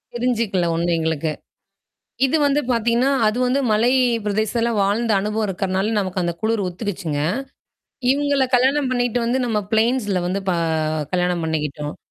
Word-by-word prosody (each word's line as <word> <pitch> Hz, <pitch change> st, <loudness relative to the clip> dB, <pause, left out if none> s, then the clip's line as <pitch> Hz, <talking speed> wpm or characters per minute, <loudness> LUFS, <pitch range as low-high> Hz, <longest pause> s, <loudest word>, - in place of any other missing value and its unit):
தெரிஞ்சுக்கல 230 Hz, -7 st, 0 dB
ஒண்ணும் 170 Hz, 0 st, +1 dB
எங்களுக்கு, 160 Hz, -1 st, -1 dB, 1.0 s
இது 320 Hz, -, +1 dB
வந்து 285 Hz, +1 st, +2 dB
பாத்தீங்கன்னா, 235 Hz, +3 st, +2 dB, 0.2 s
அது 215 Hz, +3 st, +1 dB
வந்து 265 Hz, +3 st, +1 dB
மலை 230 Hz, +4 st, +3 dB, 0.3 s
பிரதேசத்துல 220 Hz, +3 st, 0 dB
வாழ்ந்த 215 Hz, +3 st, +1 dB
அனுபவம் 210 Hz, +1 st, -1 dB
இருக்கனால, 190 Hz, +2 st, -1 dB
நமக்கு 185 Hz, -1 st, -2 dB
அந்த 170 Hz, 0 st, -1 dB
குளிர் 220 Hz, -1 st, 0 dB
ஒத்துக்கிச்சுங்க. 175 Hz, -6 st, -4 dB, 0.9 s
இவங்கள 285 Hz, -1 st, +1 dB
கல்யாணம் 265 Hz, +2 st, +2 dB
பண்ணிட்டு 245 Hz, -1 st, 0 dB
வந்து, 245 Hz, +3 st, +1 dB
நம்ம 220 Hz, -3 st, 0 dB
பிளைன்ஸ்ல 220 Hz, -3 st, +1 dB
வந்து 195 Hz, +2 st, -1 dB
ப -, -, +3 dB, 0.6 s
கல்யாணம் 180 Hz, -1 st, +1 dB
பண்ணிக்கிட்டோம். 150 Hz, -2 st, -3 dB
215 Hz, 135 wpm, -21 LUFS, 180-245 Hz, 1.0 s, மலை